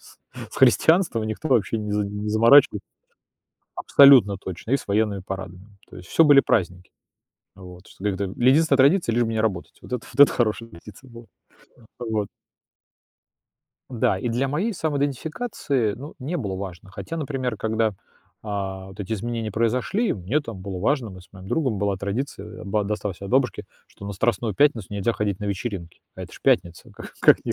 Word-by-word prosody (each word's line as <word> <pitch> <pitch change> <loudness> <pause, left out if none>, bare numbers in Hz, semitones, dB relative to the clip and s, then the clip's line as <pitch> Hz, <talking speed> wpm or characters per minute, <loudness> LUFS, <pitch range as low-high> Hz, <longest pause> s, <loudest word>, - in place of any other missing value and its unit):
с - - -18 0.3
с - - -11
христианством, 160 - +3
и - - -3
никто 110 +8 -4
вообще 115 -3 +1
не 105 -1 -5
за 105 0 0
не 105 +1 -5
заморачива 115 +7 +5 1.0
Абсолютно 130 -8 +6
точно! 95 +4 -8
И 135 - +4
с - - -10
военными 105 -1 0
парадами. 95 +1 -8
То - - -12
есть 90 -1 -12
всё - - +4
были 145 -2 +7
праздники. 90 -7 -1 0.7
А, 95 - -14
вот, 90 0 -12
что 95 - -14
как-то 100 -1 -1
или 105 +6 0
единственная 155 0 +3
традиция- 140 0 +3
лишь 120 0 +2
бы 115 - -3
не 110 - -1
работать. 100 -6 -2
Вот - - -12
это 125 - -4
вот 130 - -2
это 145 - +5
хорошая 115 -1 -1
традиция 105 +8 -14
была. 115 0 -12 0.5
А - - -20 0.2
вот. 110 -3 -2 1.6
Да 110 -6 0
и 120 - -3
для 125 +4 0
моей 175 +12 -1
самоидентификации, 145 - -2
ну, 140 +6 -10
не 145 +7 -4
было 100 - -4
важно. 95 -1 -8
Хотя, 165 +11 -7
например, 135 -6 -3
когда, 110 +1 0
э, - - -7 0.5
вот 95 -2 -5
эти 100 +1 -5
изменения 115 0 -3
произошли, 125 - 0
мне 105 +10 -1
там 115 -9 -9
было 95 -1 -6
важно: 125 +1 0
мы 95 -1 -11
с 90 - -19
моим 95 -1 -12
другом, 130 -8 0
была 100 0 0
традиция, 100 +9 -5
а, - - -9
ба 105 +1 0
досталась 105 -2 -4
от 100 - -7
бабушки, 130 -4 +1 0.2
что - - -14
на 100 - -5
Страстную 110 +1 -1
пятницу 120 -6 +2
нельзя 100 +3 -1
ходить 105 -3 -2
на - - -6
вечеринки. 100 -3 -5 0.2
А - - -7
это - - -10
ж - - -13
пятница, 85 -1 0
как - - -11
как - - +5
не - - -1
110 Hz, 190 wpm, -23 LUFS, 100-130 Hz, 1.6 s, были